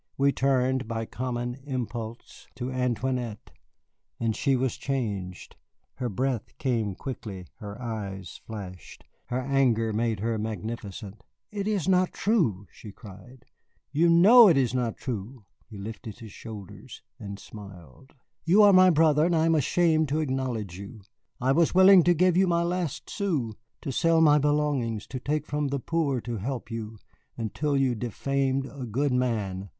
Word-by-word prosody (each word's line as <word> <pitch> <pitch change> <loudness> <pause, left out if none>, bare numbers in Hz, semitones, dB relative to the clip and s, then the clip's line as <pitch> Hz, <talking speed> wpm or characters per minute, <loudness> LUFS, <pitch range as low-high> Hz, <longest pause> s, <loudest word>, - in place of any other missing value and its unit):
We 140 +1 +4
turned 130 -2 +1
by 115 0 -3
common 120 +2 -4
impulse 120 -4 -6
to 125 +1 -4
Antoinette, 125 -2 -2 0.7
and 115 -2 0
she 135 +3 +1
was 130 -1 0
changed. 100 -9 -4 0.4
Her 125 - -2
breath 125 +2 -2
came 115 -7 -1
quickly, 100 -8 -7
her 105 0 -8
eyes 100 -6 -6
flashed, 95 -6 -9 0.2
her 125 - -2
anger 125 -5 +1
made 110 -1 0
her 110 +1 -1
magnificent. 105 0 -6 0.3
"It 205 -1 -3
is 200 -6 0
not 185 -1 +3
true," 155 - +1
she 105 - -11
cried, 120 +6 -14 0.5
"you 160 +4 +3
know 210 +8 +8
it 165 -7 +5
is 130 -3 +1
not 120 -3 -1
true." 115 -1 -6 0.2
He 110 - -10
lifted 110 +1 -7
his 115 -3 -11
shoulders 105 -3 -10 0.2
and 100 -1 -7
smiled. 100 - -13 0.3
"You 195 +6 +5
are 205 -1 +7
my 185 0 +7
brother, 155 -2 +4
and 175 - +1
I 160 0 +3
am 165 - +3
ashamed 160 +1 +2
to 150 +3 0
acknowledge 125 - -3
you. 100 +2 -10 0.4
I 130 +2 +2
was 165 +4 +2
willing 190 0 +8
to 175 0 +4
give 180 +1 +3
my 175 -3 +3
last 175 -3 -2
sou, 155 - -2 0.3
to 140 - -4
sell 165 +5 +3
my 150 -2 +6
belongings, 145 -7 0
to 130 - -4
take 150 +3 -2
from 150 -1 -1
the 140 0 -2
poor 150 -3 0
to 120 0 -4
help 120 +3 -5
you 110 -1 -6 0.4
until 140 +6 -1
you 135 -2 +2
defamed 135 +3 -1
a 130 -1 -7
good 135 +6 0
man. 105 -7 -1
125 Hz, 155 wpm, -27 LUFS, 110-150 Hz, 0.7 s, know